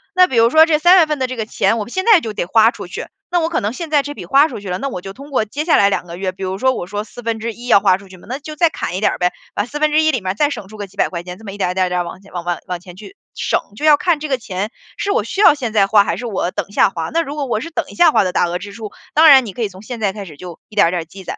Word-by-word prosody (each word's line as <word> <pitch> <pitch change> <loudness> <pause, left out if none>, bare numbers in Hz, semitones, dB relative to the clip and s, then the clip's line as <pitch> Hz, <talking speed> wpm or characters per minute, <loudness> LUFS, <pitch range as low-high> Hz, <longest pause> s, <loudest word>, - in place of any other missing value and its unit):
那 365 0 +7
比 260 - -4
如 230 +1 +5
说 315 +3 +7
这 305 -2 +2
3 355 +3 +6
月 335 - +6
份 300 -2 -3
的 260 - 0
这 255 - -5
个 220 -2 -3
钱， 225 +1 +1
我 210 - -4
现 375 +10 -3
在 445 -6 +6
就 220 -7 -6
得 175 - -2
花 225 +4 +4
出 - - -9
去， - - -6 0.2
那 350 - +1
我 325 0 0
可 340 - -1
能 205 +2 -1
现 325 +2 -7
在 290 -2 +4
这 290 +1 -7
笔 180 - -8
花 275 - +5
出 215 - -7
去 200 - -10
了， 180 - -2
那 275 - -3
我 180 - -5
就 195 +1 -8
通 280 +5 -12
过 240 -6 0
接 285 +8 -4
下 320 -1 +3
来 200 0 +4
2 175 - -2
个 170 +1 -8
月。 190 -1 -2
比 190 - -16
如 190 +1 -3
说， 260 +4 +2
我 175 - -5
说 205 +2 -4
1/4 230 +1 -5
要 200 - +6
花 190 -3 +3
出 195 -1 -16
去 185 - -13
嘛， - - -17
那 260 +4 -4
就 305 +1 -9
再 330 0 +3
砍 180 - -4
一 - - -2
点 215 - +2
儿 - - -5
呗， 180 0 +2 0.2
把 205 - -1
1/4 305 +2 +2
里 250 - -1
面 185 -1 -3
儿 - - -3
再 290 +7 +1
省 200 -9 -6
出 215 +1 -12
个 205 -1 -6
几 - - -24
百 - - +2
块 170 -2 -5
钱 180 +1 -9
，这么 215 -2 -9
一 200 - -9
点 180 - +1
儿， - - 0
一 - - -20
点 190 - +2
儿， - - -1
一 - - -4
点 180 0 0
儿 - - -2
往 170 +2 -8
前 200 - -19
往 175 -1 -4
往 175 0 -2
往 180 -1 -4
前 180 0 -13
去 220 - -12 0.2
省。 - - 0 0.2
就 300 - -4
要 300 -1 +7
看 330 0 0
这 305 - -4
个 265 -3 -1
钱， 205 +1 -4 0.3
是 400 - -1
我 465 - +1
需 390 - -6
要 410 - +7
现 250 -6 -4
在 205 -3 +4
花 205 0 +5
还 - - -2
是 245 - -6
我 190 -5 -2
等 - - -4
一 - - -19
下 205 - +3
花， 165 -4 -5
那 335 - +2
如 290 -2 -6
果 285 -2 -2
我 235 -4 -1
是 330 - -6
等 335 - -3
一 - - -11
下 345 -2 +5
花 - - +3
的 185 0 -2
大 175 - +2
额 175 +1 -2
支 200 +2 -9
出， 215 -2 -7 0.2
当 315 +1 +6
然 265 -4 +8
你 200 - -7
可 240 - -6
以 210 - 0
从 190 +2 -14
现 235 +1 -7
在 200 -3 0
开 205 -2 -7
始 155 -5 -11
就 175 +1 -10
一 - - -19
点 - - +5
儿 - - +1
一 - - -3
点 175 -2 -1
儿 - - -20
积 190 +3 -12
攒。 - - -6
220 Hz, 400 characters per minute, -18 LUFS, 190-295 Hz, 0.3 s, 然